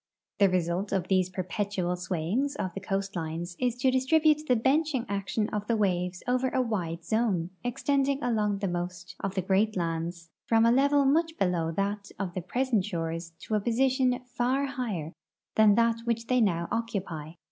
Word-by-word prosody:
The 200 Hz, -1 st, +6 dB
result 180 Hz, +2 st, 0 dB
of 185 Hz, -2 st, -1 dB
these 185 Hz, -1 st, +3 dB
perpetual 185 Hz, 0 st, -2 dB
swayings 185 Hz, -, -1 dB
of 185 Hz, -2 st, -3 dB
the 195 Hz, -, -4 dB
coastlines 175 Hz, -3 st, -3 dB
is 245 Hz, -2 st, +1 dB
to 255 Hz, +1 st, +2 dB
distribute 305 Hz, +4 st, +3 dB
the 250 Hz, -, +4 dB
benching 270 Hz, +2 st, +1 dB
action 200 Hz, +2 st, -1 dB
of 210 Hz, 0 st, -3 dB
the 230 Hz, -, +2 dB
waves 180 Hz, -3 st, 0 dB
over 255 Hz, +1 st, +2 dB
a 260 Hz, -, 0 dB
wide 175 Hz, -9 st, -2 dB
zone, 205 Hz, -7 st, 0 dB
extending 275 Hz, +3 st, 0 dB
along 210 Hz, -4 st, +1 dB
the 195 Hz, 0 st, -2 dB
most 175 Hz, 0 st, -4 dB
of 195 Hz, -1 st, -3 dB
the 190 Hz, -, 0 dB
great 200 Hz, +3 st, +2 dB
lands 165 Hz, 0 st, -3 dB, 0.2 s
from 225 Hz, 0 st, +4 dB
a 230 Hz, -, +5 dB
level 280 Hz, +2 st, +4 dB
much 320 Hz, +4 st, +2 dB
below 170 Hz, -3 st, +1 dB
that 200 Hz, +2 st, -2 dB
of 190 Hz, -3 st, -3 dB
the 185 Hz, -, -3 dB
present 240 Hz, +2 st, 0 dB
shores 165 Hz, -3 st, -4 dB
to -, -, -5 dB
a 210 Hz, -, +3 dB
position 255 Hz, +2 st, +2 dB
far 250 Hz, +3 st, 0 dB
higher 215 Hz, -, -4 dB, 0.4 s
than 215 Hz, -2 st, +6 dB
that 230 Hz, 0 st, +3 dB
which 230 Hz, -1 st, -1 dB
they 250 Hz, +1 st, +2 dB
now 170 Hz, -5 st, +1 dB
occupy. 185 Hz, -9 st, -3 dB
205 Hz, 175 wpm, -28 LUFS, 180-250 Hz, 0.4 s, The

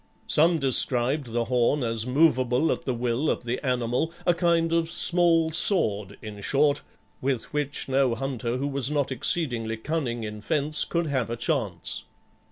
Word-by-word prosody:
Some 165 Hz, +2 st, +4 dB
described 130 Hz, -1 st, +1 dB
the 120 Hz, 0 st, -1 dB
horn 125 Hz, +3 st, +1 dB
as 115 Hz, 0 st, -1 dB
movable 130 Hz, 0 st, +2 dB
at -, -, -3 dB
the 130 Hz, -, -1 dB
will 120 Hz, +5 st, -1 dB
of -, -, -1 dB
the 120 Hz, +4 st, -3 dB
animal, 125 Hz, +4 st, -1 dB
a 175 Hz, -, +4 dB
kind 170 Hz, -1 st, +1 dB
of 165 Hz, -1 st, +1 dB
small 170 Hz, -2 st, +2 dB
sword, 105 Hz, -, +2 dB
in 105 Hz, -2 st, -8 dB
short, 145 Hz, +5 st, +2 dB, 0.4 s
with 130 Hz, -2 st, -2 dB
which 145 Hz, -1 st, -2 dB
no 135 Hz, -3 st, +2 dB
hunter 125 Hz, -2 st, -3 dB
who 140 Hz, +2 st, -2 dB
was 140 Hz, -2 st, -1 dB
not 145 Hz, -2 st, -1 dB
exceedingly 120 Hz, -5 st, -1 dB
cunning 120 Hz, -3 st, -3 dB
in 105 Hz, -1 st, -6 dB
fence 150 Hz, +4 st, 0 dB
could 170 Hz, 0 st, -1 dB
have 130 Hz, -6 st, -1 dB
a 115 Hz, -, -3 dB
chance. 115 Hz, -, -2 dB
135 Hz, 165 wpm, -26 LUFS, 120-155 Hz, 0.4 s, Some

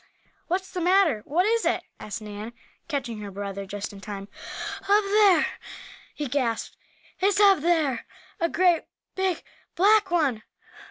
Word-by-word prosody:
"What's 370 Hz, +2 st, -2 dB
the 365 Hz, -1 st, -3 dB
matter? 355 Hz, -, +4 dB
What 345 Hz, +6 st, +1 dB
is 460 Hz, +1 st, +2 dB
it?" -, -, +1 dB, 0.2 s
asked 215 Hz, +1 st, -6 dB
Nan, 210 Hz, +2 st, -7 dB, 0.3 s
catching 260 Hz, -8 st, -3 dB
her 205 Hz, -1 st, -6 dB
brother 200 Hz, 0 st, -5 dB
just 205 Hz, +1 st, -5 dB
in 195 Hz, -, -11 dB
time. 200 Hz, -1 st, -7 dB, 0.6 s
"Up 415 Hz, +1 st, +5 dB
there!" 395 Hz, -4 st, +5 dB, 0.7 s
he 295 Hz, -, -3 dB
gasped. 245 Hz, -3 st, -1 dB, 0.4 s
"It's 395 Hz, +2 st, +2 dB
up 395 Hz, -3 st, +6 dB
there! 305 Hz, -6 st, +1 dB, 0.3 s
A 335 Hz, -, +1 dB
great 355 Hz, -2 st, +3 dB, 0.3 s
big 380 Hz, -3 st, -1 dB, 0.3 s
black 410 Hz, +3 st, +4 dB
one!" 295 Hz, -10 st, +1 dB
320 Hz, 145 wpm, -26 LUFS, -, 0.7 s, up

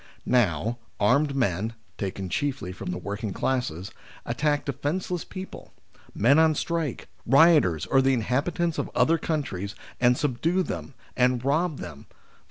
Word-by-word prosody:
Now, 115 Hz, -1 st, +1 dB, 0.2 s
armed 140 Hz, +7 st, +3 dB
men 110 Hz, -2 st, 0 dB, 0.2 s
(taken 95 Hz, -1 st, -4 dB
chiefly 130 Hz, -, -2 dB
from 95 Hz, 0 st, -7 dB
the 90 Hz, -, -2 dB
working 100 Hz, +1 st, -4 dB
classes) 100 Hz, -9 st, -2 dB, 0.3 s
attack 145 Hz, +5 st, 0 dB
defence 145 Hz, +7 st, -2 dB
less 175 Hz, -2 st, -1 dB
people: 190 Hz, 0 st, -9 dB, 0.4 s
men 140 Hz, +8 st, +5 dB
on 160 Hz, -1 st, +4 dB
strike, 165 Hz, -4 st, -2 dB, 0.2 s
rioters, 135 Hz, -, +5 dB
or 135 Hz, -, +3 dB
the 135 Hz, 0 st, +3 dB
inhabitants 150 Hz, +9 st, 0 dB
of -, -, -2 dB
other 165 Hz, +1 st, +3 dB
countries, 105 Hz, -, -3 dB, 0.2 s
and 125 Hz, 0 st, +4 dB
subdue 150 Hz, +7 st, 0 dB
them, 140 Hz, -, -6 dB, 0.2 s
and 125 Hz, 0 st, +2 dB
rob 155 Hz, +2 st, +1 dB
them 80 Hz, -5 st, -9 dB
(i.e. -, -, -28 dB
130 Hz, 145 wpm, -26 LUFS, 100-155 Hz, 0.4 s, men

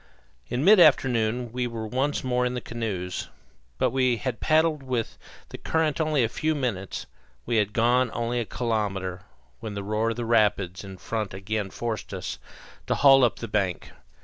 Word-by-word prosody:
In 125 Hz, +5 st, -1 dB
mid 210 Hz, +1 st, +8 dB
afternoon 125 Hz, -6 st, +3 dB
we 125 Hz, 0 st, -1 dB
were 115 Hz, -2 st, -5 dB
once 130 Hz, +6 st, -1 dB
more 125 Hz, -1 st, +1 dB
in 125 Hz, 0 st, -1 dB
the -, -, -1 dB
canoes; 105 Hz, -7 st, -4 dB, 0.5 s
but -, -, +1 dB
we 130 Hz, -2 st, +2 dB
had 125 Hz, +1 st, -3 dB
paddled 155 Hz, -1 st, +2 dB
with 125 Hz, -4 st, -3 dB, 0.3 s
the -, -, -8 dB
current 160 Hz, -1 st, 0 dB
only 155 Hz, -4 st, +2 dB
a -, -, +2 dB
few 155 Hz, +7 st, -1 dB
minutes, 115 Hz, -9 st, -3 dB, 0.4 s
we 115 Hz, -, 0 dB
had 105 Hz, -1 st, +2 dB
gone 120 Hz, +3 st, +3 dB
only 120 Hz, +1 st, -1 dB
a 115 Hz, -, -2 dB
kilometre, 100 Hz, -6 st, -2 dB, 0.4 s
when 105 Hz, +5 st, -6 dB
the 100 Hz, -, -4 dB
roar 110 Hz, +3 st, 0 dB
of 115 Hz, -, -3 dB
rapids 105 Hz, -6 st, +1 dB
in 95 Hz, -1 st, -9 dB
front 110 Hz, -1 st, -4 dB
again 100 Hz, +1 st, -3 dB
forced 115 Hz, 0 st, -4 dB
us -, -, -5 dB, 0.5 s
to -, -, +1 dB
haul 135 Hz, -2 st, +6 dB
up 120 Hz, -, +3 dB
to -, -, -14 dB
the 115 Hz, -, -4 dB
bank. 100 Hz, -4 st, -2 dB
115 Hz, 180 wpm, -26 LUFS, 105-130 Hz, 0.5 s, mid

